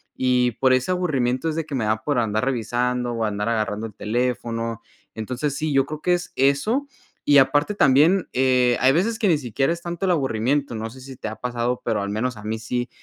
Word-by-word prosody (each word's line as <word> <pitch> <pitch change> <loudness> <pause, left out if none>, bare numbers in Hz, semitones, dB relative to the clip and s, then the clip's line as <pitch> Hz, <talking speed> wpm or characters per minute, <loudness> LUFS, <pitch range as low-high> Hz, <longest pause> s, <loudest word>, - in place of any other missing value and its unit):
y 125 -1 +2
por 130 +2 +2
ese 130 +7 +1
aburrimiento 140 -6 0
es 155 - -3
de 165 -1 -2
que 145 - -5
me 120 -4 -1
da 110 +1 0
por 145 -3 0
andar 110 0 0
revisando 125 0 -1
o 115 -1 -1
andar 105 +1 -2
agarrando 110 -1 -1
el 105 - -13
teléfono. 115 0 -2 0.3
Entonces 125 +6 -3
sí, 155 +2 -2
yo 135 -1 +3
creo 155 0 -7
que 180 - +2
es 175 0 -2
eso 175 - +1 0.4
y 145 -1 +5
aparte 145 +7 +3
también, 165 +4 +4
eh, 125 -1 +3
hay 130 - +5
veces 200 +10 +1
que 210 -3 +1
ni 160 - +4
siquiera 135 +2 -1
es 170 0 -3
tanto 170 +2 -5
el 185 - +2
aburrimiento, 135 -3 0
no 110 +1 -4
sé 130 +4 -13
si 130 0 -10
te 110 - -5
ha 110 - -7
pasado, 120 0 -2
pero 110 -3 0
al 100 - -3
menos 120 +4 -2
a 105 - -11
mí 110 +1 -3
sí, 120 +2 -3
125 Hz, 225 wpm, -23 LUFS, 115-145 Hz, 0.4 s, y